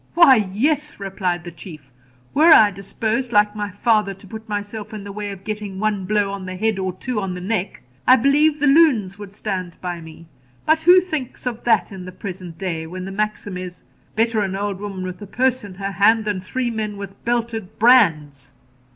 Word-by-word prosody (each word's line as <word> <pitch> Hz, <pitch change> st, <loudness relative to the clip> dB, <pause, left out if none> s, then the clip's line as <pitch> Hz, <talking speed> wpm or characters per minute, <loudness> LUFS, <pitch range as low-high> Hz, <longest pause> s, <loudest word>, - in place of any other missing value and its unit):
'Why, 265 Hz, -, +6 dB
yes,' 295 Hz, +7 st, 0 dB
replied 185 Hz, -3 st, -2 dB
the 175 Hz, -, -8 dB
Chief, 155 Hz, -5 st, -12 dB, 0.4 s
'were 320 Hz, +4 st, +6 dB
I 210 Hz, -8 st, +8 dB
disposed, 220 Hz, +5 st, -3 dB
like 210 Hz, -1 st, +3 dB
my 205 Hz, -1 st, -3 dB
father, 205 Hz, 0 st, +1 dB
to 195 Hz, -, -16 dB
put 220 Hz, +2 st, -9 dB
myself 210 Hz, +1 st, -5 dB
in 205 Hz, -, -7 dB
the 200 Hz, -, -7 dB
way 205 Hz, 0 st, -5 dB
of 195 Hz, -1 st, -9 dB
getting 210 Hz, -2 st, -5 dB
one 210 Hz, -2 st, -1 dB
blow 205 Hz, 0 st, +1 dB
on 195 Hz, -2 st, -6 dB
the 185 Hz, -, -5 dB
head, 215 Hz, +1 st, 0 dB
or 185 Hz, -1 st, -1 dB
two 220 Hz, +5 st, -4 dB
on 190 Hz, -2 st, -3 dB
the -, -, -6 dB
neck, 195 Hz, +1 st, -3 dB, 0.2 s
I 255 Hz, -, +9 dB
believe 290 Hz, +4 st, +3 dB
the 290 Hz, -, +2 dB
loons 270 Hz, -, +4 dB
would 205 Hz, -2 st, -9 dB
stand 190 Hz, -4 st, -5 dB
by 175 Hz, -2 st, -5 dB
me. 160 Hz, +1 st, -12 dB, 0.4 s
But 315 Hz, +1 st, +3 dB
who 360 Hz, +3 st, +7 dB
thinks 310 Hz, -10 st, -5 dB
of 240 Hz, -2 st, -4 dB
that 225 Hz, -3 st, +2 dB
in 190 Hz, -2 st, -8 dB
the 185 Hz, -, -8 dB
present 180 Hz, -3 st, -8 dB
day, 165 Hz, -3 st, -4 dB
when 185 Hz, +2 st, -6 dB
the 195 Hz, -, -6 dB
maxim 210 Hz, -1 st, -3 dB
is, 180 Hz, -1 st, -8 dB, 0.3 s
"Better 225 Hz, 0 st, +1 dB
an 195 Hz, -2 st, -1 dB
old 200 Hz, -1 st, -3 dB
woman 195 Hz, -2 st, -5 dB
with 185 Hz, 0 st, -6 dB
a 205 Hz, -, -8 dB
purse 255 Hz, +3 st, 0 dB
in 200 Hz, -3 st, -9 dB
her 195 Hz, +1 st, -4 dB
hand 215 Hz, +3 st, +3 dB
than 205 Hz, -3 st, -2 dB
three 240 Hz, +6 st, -2 dB
men 215 Hz, -2 st, -4 dB
with 200 Hz, 0 st, -9 dB
belted 230 Hz, -4 st, -2 dB
brands"?' 155 Hz, -, +3 dB
205 Hz, 210 wpm, -21 LUFS, 185-230 Hz, 0.4 s, I